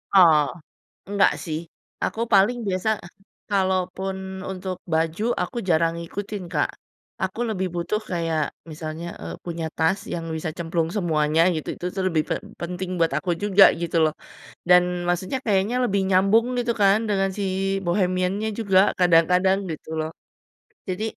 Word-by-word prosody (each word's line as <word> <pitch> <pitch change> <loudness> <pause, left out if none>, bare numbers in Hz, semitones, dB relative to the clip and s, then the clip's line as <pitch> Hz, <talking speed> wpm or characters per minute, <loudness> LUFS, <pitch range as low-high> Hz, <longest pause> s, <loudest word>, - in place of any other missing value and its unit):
Oh, 160 -5 +7 0.6
enggak 200 -1 +3
sih 155 -2 -3 0.5
aku 225 - -2
paling 200 +5 +5
biasa 185 +3 -1 0.6
kalaupun 190 0 0 0.4
untuk 185 -1 -4 0.2
baju 165 +6 0 0.2
aku 245 - -5
jarang 165 0 +3
ngikutin, 200 +4 -5
Kak, - - +1 0.5
aku 190 +5 -2
lebih 190 -3 -1
butuh 175 +5 -1
kayak 165 -3 0 0.3
misalnya, 155 +2 -6 0.2
eee, 80 0 -5
punya 170 -2 -4
tas 165 +5 +2
yang 165 -1 -3
bisa 160 0 -3
cemplung 165 -1 -1
semuanya 155 -3 +1 0.2
gitu, 155 - -5
itu 180 - -6
tuh 190 - -1
lebih 160 -3 +1
pe - - +1 0.3
penting 180 +1 -4
buat 165 -3 +2
aku 180 +2 -3
juga 200 -1 +6 0.2
gitu 170 0 -2
loh, 155 - +2 0.6
dan 180 0 +8 0.2
maksudnya 185 +8 0
kayaknya 205 +3 +1
lebih 200 -4 +1
nyambung 195 +5 +4
gitu 240 -1 0
kan 200 +1 +6
dengan 195 -1 +1
si 200 - -1 0.4
bohemiannya 185 +3 0
juga 195 -4 +4 0.2
kadang-kadang 180 +2 +4
gitu 155 - -8
loh. 155 0 -2 0.8
Jadi, 185 +3 -3
185 Hz, 145 wpm, -24 LUFS, 165-195 Hz, 0.8 s, dan